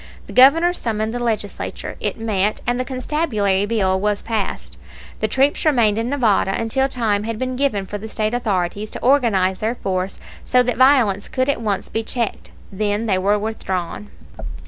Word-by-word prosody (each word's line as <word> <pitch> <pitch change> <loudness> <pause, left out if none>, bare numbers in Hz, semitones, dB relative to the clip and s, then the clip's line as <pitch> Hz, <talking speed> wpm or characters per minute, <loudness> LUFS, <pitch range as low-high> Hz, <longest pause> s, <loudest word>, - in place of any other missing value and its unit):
The - - -10
Governor 320 +7 +6
summoned 220 -7 -2
the 245 - -3
Legislature, 220 -4 -3
it - - -2
met, 215 -2 0
and 245 +1 0
the - - +1
constabulary 250 -8 0
bill 190 -4 +1
was 205 +1 -1
passed. 220 -4 -4 0.4
The - - +1
troops 275 +2 +1
remained 235 -8 +3
in 230 +2 -2
Nevada 220 -8 +2
until 250 +4 +1
time 225 -6 0
had 225 -1 -3
been 255 +2 -3
given 250 -8 0
for 205 +2 -6
the 220 +2 -8
State 215 +1 -1
authorities 205 -3 -1
to - - -7
organize 220 -8 +3
their 225 +3 -1
force 185 -3 -3 0.2
so 250 0 +3
that 245 -1 -1
violence 250 -7 +4
could 260 +1 0
at 280 - 0
once 205 -4 -1
be 225 - -2
checked. 230 0 -3 0.2
Then 205 +2 -1
they 190 -4 +1
were 200 +2 +2
withdrawn. 205 -2 -4
220 Hz, 175 wpm, -20 LUFS, 205-250 Hz, 0.4 s, Governor